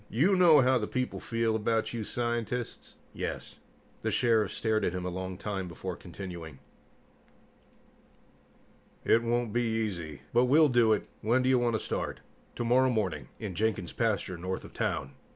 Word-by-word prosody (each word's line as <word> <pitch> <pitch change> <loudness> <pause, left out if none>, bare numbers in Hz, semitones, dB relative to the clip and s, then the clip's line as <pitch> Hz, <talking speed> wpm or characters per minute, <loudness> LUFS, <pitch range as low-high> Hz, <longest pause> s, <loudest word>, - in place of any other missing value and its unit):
"You 170 - +3
know 170 -6 +7
how 130 0 +4
the 105 - -2
people 125 0 -2
feel 115 -1 0
about 110 +1 0
you 115 -2 -3
scientists?" 120 +1 -3 0.2
"Yes." - - -5 0.4
The - - -1
Sheriff 115 -4 +2
stared 110 -1 0
at 90 - 0
him 90 -1 -3
a 90 - -2
long 95 0 -5
time 100 -2 -3
before 90 +2 -5
continuing. 85 -5 -8 2.5
"It 115 - +5
won't 120 -1 0
be 120 - +2
easy, 105 -9 -2
but 120 +1 +5
we'll 150 +4 +5
do 120 -3 +4
it. 105 - +1
When 120 +4 +2
do 130 - +2
you 130 -1 +4
want 120 -1 +1
to - - 0
start?" - - -3 0.3
"Tomorrow 125 +2 +3
morning. 95 - -1
In 105 -4 -5
Jenkin's 100 -2 -1
pasture, 100 -6 -1
north 95 +2 -3
of - - -12
town." - - -2
110 Hz, 165 wpm, -30 LUFS, 95-120 Hz, 2.5 s, know